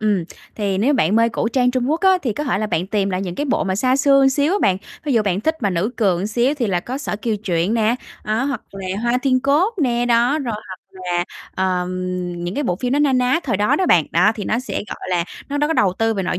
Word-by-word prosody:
ừm, 205 Hz, -5 st, +1 dB, 0.3 s
thì 200 Hz, -3 st, -1 dB
nếu 260 Hz, +8 st, +2 dB
bạn 205 Hz, -, +2 dB
mê 230 Hz, 0 st, +4 dB
cổ 230 Hz, -, -1 dB
trang 250 Hz, +1 st, +2 dB
Trung 255 Hz, +1 st, -1 dB
Quốc 320 Hz, +2 st, 0 dB
á, 380 Hz, 0 st, +4 dB
thì 240 Hz, -, -1 dB
có 295 Hz, -, -4 dB
thể 255 Hz, -8 st, 0 dB
là 215 Hz, -, -1 dB
bạn 180 Hz, -4 st, -1 dB
tìm 200 Hz, -1 st, 0 dB
lại 185 Hz, 0 st, -2 dB
những 180 Hz, -3 st, -4 dB
cái 290 Hz, -, -2 dB
bộ 265 Hz, -, 0 dB
mà 190 Hz, -1 st, -1 dB
xa 255 Hz, +5 st, +2 dB
xưa 275 Hz, -1 st, +4 dB
xíu 285 Hz, +5 st, +1 dB
á 405 Hz, -, +2 dB
bạn, 185 Hz, -, +3 dB, 0.3 s
ví 295 Hz, -, 0 dB
dụ 230 Hz, -3 st, +3 dB
bạn 195 Hz, -2 st, 0 dB
thích 315 Hz, +8 st, +1 dB
mà 200 Hz, -, +2 dB
nữ 185 Hz, +5 st, 0 dB
cường 190 Hz, -4 st, +1 dB
xíu 240 Hz, +6 st, +1 dB
thì 255 Hz, -6 st, -1 dB
là 180 Hz, -4 st, 0 dB
có 250 Hz, +8 st, -5 dB
Sở 280 Hz, -7 st, -3 dB
Kiều 220 Hz, +1 st, -2 dB
Truyện 180 Hz, +2 st, 0 dB
nè, 225 Hz, 0 st, +2 dB, 0.3 s
đó, 215 Hz, +5 st, 0 dB
hoặc 275 Hz, 0 st, -3 dB
là 195 Hz, -1 st, -7 dB, 0.2 s
Hoa 240 Hz, +1 st, +1 dB
Thiên 255 Hz, -2 st, +2 dB
Cốt 300 Hz, -, +2 dB
nè, 240 Hz, -2 st, +1 dB
đó. 240 Hz, +5 st, +3 dB
Rồi 245 Hz, -7 st, -3 dB
hoặc 185 Hz, -1 st, -8 dB
là, 180 Hz, -2 st, -2 dB, 0.3 s
ờm, 185 Hz, -1 st, 0 dB, 0.6 s
những 175 Hz, +2 st, -3 dB
cái 290 Hz, -, -1 dB
bộ 180 Hz, -7 st, 0 dB
phim 250 Hz, +5 st, -2 dB
nó 285 Hz, -, +2 dB
na 290 Hz, -2 st, +3 dB
ná 255 Hz, +5 st, +2 dB
thời 240 Hz, -, 0 dB
đó 205 Hz, +2 st, +2 dB
đó 375 Hz, -, +1 dB
bạn, 170 Hz, -, +5 dB
đó, 180 Hz, +6 st, +4 dB
thì 210 Hz, -, -5 dB
nó 235 Hz, -, 0 dB
sẽ, 255 Hz, -, -6 dB
gọi -, -, -7 dB
là, 175 Hz, -1 st, +1 dB, 0.2 s
nó, 285 Hz, +1 st, -2 dB
đó, 295 Hz, -, +2 dB
có 320 Hz, -, 0 dB
đầu 195 Hz, -, +2 dB
tư 225 Hz, 0 st, +1 dB
về 195 Hz, -, -1 dB
nội 180 Hz, 0 st, -2 dB
230 Hz, 280 wpm, -20 LUFS, 195-270 Hz, 0.6 s, bạn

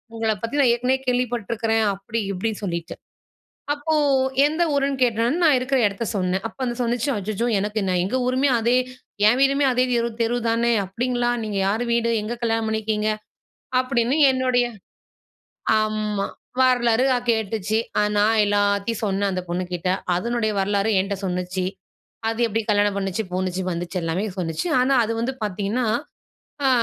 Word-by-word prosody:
உங்கள 225 Hz, -1 st, 0 dB
பத்தி 275 Hz, +6 st, -2 dB
நான் 250 Hz, -4 st, +5 dB
ஏற்கனவே 250 Hz, +2 st, +1 dB
கேள்விப்பட்டுருக்கிறேன்." 230 Hz, -2 st, 0 dB
அப்படி 200 Hz, +4 st, -4 dB
இப்படின்னு 210 Hz, +3 st, -3 dB
சொல்லிட்டு. 170 Hz, -3 st, -4 dB, 0.8 s
அப்போ 300 Hz, +2 st, -2 dB, 0.5 s
எந்த 315 Hz, +3 st, 0 dB
ஊருன்னு 275 Hz, -1 st, 0 dB
கேட்டவுடனே, 235 Hz, +5 st, +1 dB
நான் 300 Hz, -5 st, +5 dB
இருக்கிற 265 Hz, +1 st, 0 dB
இடத்த 200 Hz, +3 st, -4 dB
சொன்னேன். 185 Hz, +1 st, -1 dB
அப்போ 225 Hz, -, -17 dB
அது 240 Hz, -, -2 dB
சொல்லுச்சு, 240 Hz, +3 st, 0 dB
"அச்சச்சோ! 210 Hz, +3 st, -2 dB
எனக்கு 210 Hz, +2 st, -2 dB
நான் 180 Hz, -1 st, +1 dB
எங்க 250 Hz, +7 st, -1 dB
ஊருமே 260 Hz, +2 st, +2 dB
அதே 240 Hz, +3 st, +3 dB, 0.5 s
என் 240 Hz, +4 st, +4 dB
வீடுமே 275 Hz, +1 st, +3 dB
அதே 250 Hz, +1 st, +3 dB
தெரு 235 Hz, 0 st, +1 dB
தெரு 235 Hz, +1 st, +1 dB
தானே." 235 Hz, +1 st, +2 dB
அப்படிங்களா! 240 Hz, +5 st, -1 dB
நீங்க 210 Hz, -2 st, -3 dB
யாரு 215 Hz, +4 st, 0 dB
வீடு? 235 Hz, 0 st, +1 dB
எங்க 220 Hz, +3 st, -3 dB
கல்யாணம் 225 Hz, -1 st, 0 dB
பண்ணிருக்கீங்க?" 215 Hz, 0 st, -1 dB, 0.7 s
அப்படின்னு 255 Hz, +2 st, 0 dB
என்னுடைய 255 Hz, -1 st, +2 dB, 1.1 s
ஆமா. 215 Hz, -2 st, -1 dB, 0.3 s
வரலாறு 245 Hz, -2 st, +3 dB
அ -, -, +1 dB
கேட்டுச்சு. 220 Hz, -1 st, -1 dB, 0.2 s
அ -, -, +3 dB
நான் 215 Hz, +2 st, +3 dB
எல்லாத்தையும் 205 Hz, +2 st, 0 dB
சொன்னேன் 200 Hz, 0 st, 0 dB
அந்த 185 Hz, 0 st, -2 dB
பொண்ணுகிட்ட. 180 Hz, 0 st, -2 dB, 0.2 s
அதனுடைய 230 Hz, +4 st, 0 dB
வரலாற 200 Hz, +1 st, +1 dB
என்ட்ட 200 Hz, +1 st, -2 dB
சொல்லுச்சு. 180 Hz, 0 st, -2 dB, 0.6 s
அது 225 Hz, +1 st, -2 dB
எப்படி 225 Hz, +1 st, -1 dB
கல்யாணம் 205 Hz, -1 st, +2 dB
பண்ணுச்சு, 195 Hz, +2 st, -2 dB
போணுச்சு, 185 Hz, 0 st, -1 dB
வந்துச்சு 175 Hz, +2 st, -4 dB
எல்லாமே 165 Hz, +6 st, -1 dB
சொல்லுச்சு. 165 Hz, -, -2 dB
ஆனா 265 Hz, +1 st, +3 dB
அது 225 Hz, +1 st, -2 dB
வந்து 260 Hz, +3 st, -2 dB
பார்த்தீங்கன்னா 205 Hz, +5 st, -1 dB, 0.8 s
அ -, -, +5 dB
225 Hz, 150 wpm, -23 LUFS, 200-245 Hz, 1.1 s, நான்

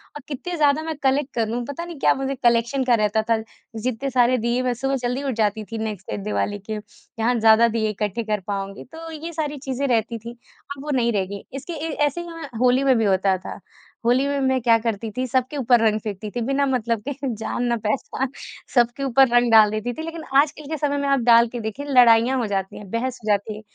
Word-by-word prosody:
और 295 Hz, -, -7 dB
कित्ते 330 Hz, +5 st, -5 dB
ज़्यादा 295 Hz, 0 st, +3 dB
मैं 320 Hz, -1 st, -4 dB
कलेक्ट 270 Hz, +1 st, +1 dB
कर 230 Hz, -2 st, +1 dB
लूँ, 240 Hz, +2 st, -2 dB
पता 285 Hz, +4 st, -5 dB
नहीं 345 Hz, -2 st, -8 dB
क्या -, -, +4 dB
मुझे 270 Hz, 0 st, -3 dB
कलेक्शन 235 Hz, +3 st, +2 dB
का 245 Hz, -2 st, +4 dB
रहता 210 Hz, +1 st, +2 dB
था। 225 Hz, -, +4 dB, 0.4 s
जित्ते 255 Hz, +3 st, -2 dB
सारे 250 Hz, 0 st, +3 dB
दीये 235 Hz, +2 st, 0 dB
मैं 250 Hz, -1 st, +1 dB
सुबह 270 Hz, +3 st, -1 dB
जल्दी 250 Hz, +2 st, -2 dB
उठ 270 Hz, -, -1 dB
जाती 215 Hz, -1 st, 0 dB
थी 225 Hz, -, -3 dB
नेक्स्ट 220 Hz, -3 st, -5 dB
डे 105 Hz, -, -2 dB
दिवाली 105 Hz, -, -2 dB
के, 215 Hz, +2 st, -5 dB
कि 210 Hz, +2 st, -14 dB
हाँ, 240 Hz, +2 st, +2 dB
ज़्यादा 225 Hz, +1 st, +6 dB
दीये 220 Hz, -1 st, 0 dB
इकट्ठे 210 Hz, +2 st, -2 dB
कर 210 Hz, -1 st, -1 dB
पाऊँगी, 195 Hz, -1 st, -4 dB
तो 325 Hz, +3 st, -10 dB
ये 320 Hz, +2 st, -7 dB
सारी 300 Hz, -2 st, -3 dB
चीज़ें 270 Hz, 0 st, -3 dB
रहती 230 Hz, -1 st, 0 dB
थी। 235 Hz, +2 st, -8 dB, 0.5 s
अब 275 Hz, -, -9 dB
वो 300 Hz, -, -3 dB
नहीं 235 Hz, -2 st, +2 dB
रह 195 Hz, -2 st, +1 dB
गई, 200 Hz, +1 st, -8 dB
इसके 275 Hz, +6 st, -6 dB
ए 320 Hz, +1 st, -4 dB, 0.2 s
ऐसे 290 Hz, +4 st, -2 dB
ही 345 Hz, -, -8 dB
हमें 330 Hz, -3 st, -7 dB
होली 250 Hz, +2 st, +3 dB
में 265 Hz, -3 st, +4 dB
भी 225 Hz, -, +1 dB
होता 190 Hz, -1 st, +2 dB
था, 185 Hz, -, -8 dB, 0.5 s
होली 255 Hz, +4 st, +3 dB
में 285 Hz, 0 st, -1 dB
मैं 260 Hz, -1 st, +2 dB
क्या 230 Hz, -1 st, +5 dB
करती 225 Hz, -1 st, -3 dB
थी? 255 Hz, -, 0 dB
सबके 260 Hz, +3 st, -1 dB
ऊपर 245 Hz, -3 st, +4 dB
रंग 215 Hz, 0 st, +1 dB
फेंकती 210 Hz, 0 st, -5 dB
थी 240 Hz, -, -1 dB
बिना 275 Hz, +4 st, +1 dB
मतलब 235 Hz, -4 st, 0 dB
के -, -, -2 dB, 0.2 s
जान 220 Hz, +3 st, -3 dB
ना 240 Hz, -1 st, +1 dB
पहचान 260 Hz, +3 st, -1 dB, 0.5 s
सबके 240 Hz, +2 st, +2 dB
ऊपर 270 Hz, 0 st, +5 dB
रंग 240 Hz, -1 st, +4 dB
डाल 215 Hz, -2 st, +7 dB
देती 215 Hz, +3 st, -3 dB
थी। 315 Hz, -, -7 dB
लेकिन 330 Hz, 0 st, -6 dB, 0.2 s
आजकल 300 Hz, 0 st, -4 dB
के 315 Hz, -, -1 dB
समय 285 Hz, -1 st, 0 dB
में 280 Hz, 0 st, -1 dB
आप 275 Hz, -, +3 dB
डाल 235 Hz, 0 st, +7 dB
के 240 Hz, +1 st, -6 dB
देखिए 220 Hz, +6 st, -5 dB
लड़ाइयाँ 245 Hz, 0 st, +5 dB
हो 240 Hz, -, 0 dB
जाती 195 Hz, -2 st, -3 dB
है, 205 Hz, -, -9 dB
बहस 250 Hz, +2 st, -2 dB
हो -, -, -8 dB
जाती 205 Hz, +1 st, 0 dB
है, -, -, -10 dB
245 Hz, 245 wpm, -22 LUFS, 220-275 Hz, 0.5 s, डाल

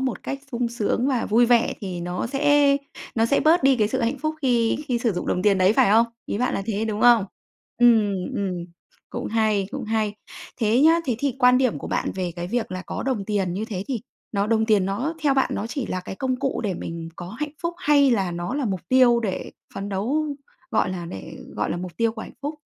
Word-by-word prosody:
một 265 Hz, -2 st, -2 dB
cách 275 Hz, -, -4 dB
sung 240 Hz, 0 st, 0 dB
sướng 235 Hz, +2 st, -1 dB
và 255 Hz, -4 st, 0 dB
vui 235 Hz, +3 st, +4 dB
vẻ, 235 Hz, -1 st, +3 dB
thì 185 Hz, -4 st, -5 dB
nó 180 Hz, +4 st, -3 dB
sẽ 285 Hz, +1 st, +3 dB, 0.4 s
nó 225 Hz, 0 st, +2 dB
sẽ 280 Hz, -, +2 dB
bớt 315 Hz, +1 st, +4 dB
đi 270 Hz, -1 st, +5 dB
cái 210 Hz, -2 st, +2 dB
sự 260 Hz, +3 st, -1 dB
hạnh 240 Hz, +4 st, 0 dB
phúc 310 Hz, +3 st, -2 dB
khi 235 Hz, -3 st, +2 dB
khi 245 Hz, -2 st, +1 dB
sử 235 Hz, -3 st, 0 dB
dụng 180 Hz, -, -4 dB
đồng 180 Hz, -, 0 dB
tiền 200 Hz, -2 st, +3 dB
đấy, 185 Hz, +2 st, +5 dB
phải 200 Hz, -, +4 dB
không? 230 Hz, +2 st, +5 dB, 0.2 s
Ý -, -, -3 dB
bạn 250 Hz, -, 0 dB
là 195 Hz, -, -2 dB
thế, 220 Hz, -1 st, -1 dB
đúng 215 Hz, -1 st, -3 dB
không? 240 Hz, -4 st, +6 dB, 0.5 s
Ừm, 225 Hz, -4 st, +5 dB, 0.2 s
ừm, 185 Hz, -5 st, -2 dB, 0.5 s
cũng -, -, -4 dB
hay, 215 Hz, -3 st, +1 dB
cũng 275 Hz, -3 st, -5 dB
hay. 215 Hz, -1 st, -1 dB, 0.5 s
Thế 225 Hz, +2 st, +3 dB
nhá, 320 Hz, +3 st, +6 dB
thế 245 Hz, -6 st, -1 dB
thì 275 Hz, -1 st, -1 dB
quan 250 Hz, -1 st, +5 dB
điểm 255 Hz, -, +1 dB
của -, -, -7 dB
bạn -, -, -1 dB
về 180 Hz, -2 st, -3 dB
cái 175 Hz, 0 st, -4 dB
việc 235 Hz, -3 st, -2 dB
là 185 Hz, 0 st, -4 dB
có -, -, -4 dB
đồng 255 Hz, -7 st, -1 dB
tiền 195 Hz, -4 st, -1 dB
như 205 Hz, +4 st, -2 dB
thế 200 Hz, -4 st, -5 dB
thì 250 Hz, -5 st, -2 dB, 0.3 s
nó 200 Hz, -1 st, 0 dB
đồng 220 Hz, 0 st, +2 dB
tiền 210 Hz, -4 st, +3 dB
nó 240 Hz, +12 st, -2 dB
theo 280 Hz, -3 st, +3 dB
bạn 265 Hz, -, +2 dB
nó 205 Hz, -, -3 dB
chỉ 245 Hz, +2 st, -4 dB
là 185 Hz, -, -3 dB
cái 185 Hz, -, -7 dB
công 260 Hz, +2 st, -1 dB
cụ 270 Hz, 0 st, -2 dB
để 195 Hz, -3 st, 0 dB
mình 165 Hz, -1 st, -6 dB
có 175 Hz, -, -7 dB
hạnh 285 Hz, +9 st, -5 dB
phúc 340 Hz, 0 st, -2 dB
hay 285 Hz, -2 st, +4 dB
là 195 Hz, -6 st, +1 dB
nó 175 Hz, +6 st, -4 dB
là 285 Hz, -1 st, -1 dB
mục 195 Hz, -5 st, -2 dB
tiêu 250 Hz, -2 st, +5 dB
để 195 Hz, -5 st, -3 dB, 0.2 s
phấn 195 Hz, +1 st, -4 dB
đấu, 245 Hz, +11 st, -1 dB, 0.4 s
gọi -, -, +1 dB
là 175 Hz, -2 st, -5 dB
để 95 Hz, -, -8 dB, 0.2 s
gọi -, -, -1 dB
là -, -, -1 dB
mục 180 Hz, 0 st, -7 dB
tiêu 230 Hz, -1 st, +1 dB
của 220 Hz, -, -7 dB
hạnh -, -, -10 dB
phúc? 300 Hz, +2 st, -4 dB
225 Hz, 245 wpm, -23 LUFS, 195-260 Hz, 0.5 s, không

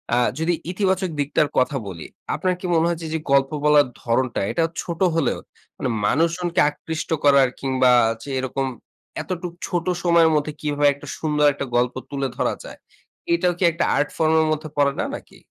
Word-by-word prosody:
আ -, -, +2 dB, 0.2 s
যদি 165 Hz, +2 st, +1 dB, 0.2 s
ইতিবাচক 190 Hz, -1 st, 0 dB
দিকটার 145 Hz, +1 st, +1 dB
কথা 130 Hz, +2 st, +2 dB
বলি, 85 Hz, -4 st, -7 dB, 0.3 s
আপনার 185 Hz, -1 st, 0 dB
কি 185 Hz, -, -7 dB
মনে 165 Hz, 0 st, +3 dB
হয় 170 Hz, -, 0 dB
যে, 165 Hz, -, -6 dB
এইযে 160 Hz, +1 st, -2 dB
গল্প 135 Hz, 0 st, +3 dB
বলার 150 Hz, -2 st, +5 dB
ধরণটা, 125 Hz, +1 st, 0 dB
এটা 165 Hz, -, +1 dB, 0.2 s
ছোট 170 Hz, -2 st, -6 dB, 0.2 s
হলেও 160 Hz, -7 st, 0 dB, 0.4 s
মানে, 130 Hz, -, -2 dB, 0.2 s
মানুষজনকে 170 Hz, -, +1 dB
আকৃষ্ট 155 Hz, +1 st, -6 dB
করার 140 Hz, -3 st, +5 dB
কিংবা 130 Hz, -2 st, +2 dB, 0.3 s
যে -, -, -9 dB
এরকম 130 Hz, +1 st, -2 dB, 0.6 s
এতটুক 180 Hz, -1 st, -5 dB
ছোট 175 Hz, -2 st, -2 dB, 0.2 s
সময়ের 170 Hz, -2 st, +5 dB
মধ্যে 150 Hz, 0 st, 0 dB
কিভাবে 145 Hz, -1 st, +1 dB
একটা 140 Hz, -, -13 dB
সুন্দর 150 Hz, -2 st, +1 dB
একটা 140 Hz, -, -4 dB
গল্প 125 Hz, +1 st, +2 dB, 0.2 s
তুলে 140 Hz, -1 st, -2 dB
ধরা -, -, +1 dB
যায়, -, -, -10 dB, 0.6 s
এটাও 175 Hz, +1 st, +2 dB
কি 185 Hz, -, -2 dB
একটা 170 Hz, -, -1 dB
আর্ট 145 Hz, -, +1 dB
ফর্ম 160 Hz, -1 st, +2 dB
এর 160 Hz, -, +1 dB
মধ্যে 155 Hz, 0 st, -3 dB
পড়ে 140 Hz, -1 st, +4 dB
না, -, -, 0 dB
নাকি? -, -, -12 dB
150 Hz, 180 wpm, -22 LUFS, 140-170 Hz, 0.6 s, বলার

